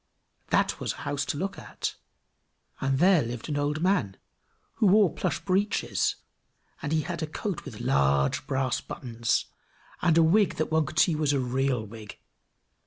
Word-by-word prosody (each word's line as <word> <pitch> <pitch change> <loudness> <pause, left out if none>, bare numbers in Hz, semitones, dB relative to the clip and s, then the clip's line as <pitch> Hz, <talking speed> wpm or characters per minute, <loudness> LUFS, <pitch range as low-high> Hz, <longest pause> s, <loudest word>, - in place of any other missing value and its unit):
That - - +1
was - - -2
a - - -10
house 145 0 -1
to - - -2
look 195 +5 -3
at; - - -4 0.9
and 135 0 0
there 180 +1 +5
lived 120 +4 -5
an 145 - -1
old 145 +2 -1
man, 140 - +1 0.6
who 220 - +4
wore 195 -3 +5
plush - - -1
breeches; 200 +3 +1 0.7
and 145 - -3
he 160 -1 +2
had 170 +2 -5
a 155 - -2
coat 185 +3 -4
with 120 -7 -8
large 70 - +2
brass 130 -2 0
buttons, 115 -2 -2 0.6
and 170 -2 +3
a 165 - +6
wig 190 +3 +3
that 155 - -2
one 160 -2 +2
could 155 - -8
see 165 - +5
was 150 -2 +1
a 140 - +1
real 130 -2 0
wig. 110 -1 -10
145 Hz, 175 wpm, -27 LUFS, 125-170 Hz, 0.9 s, a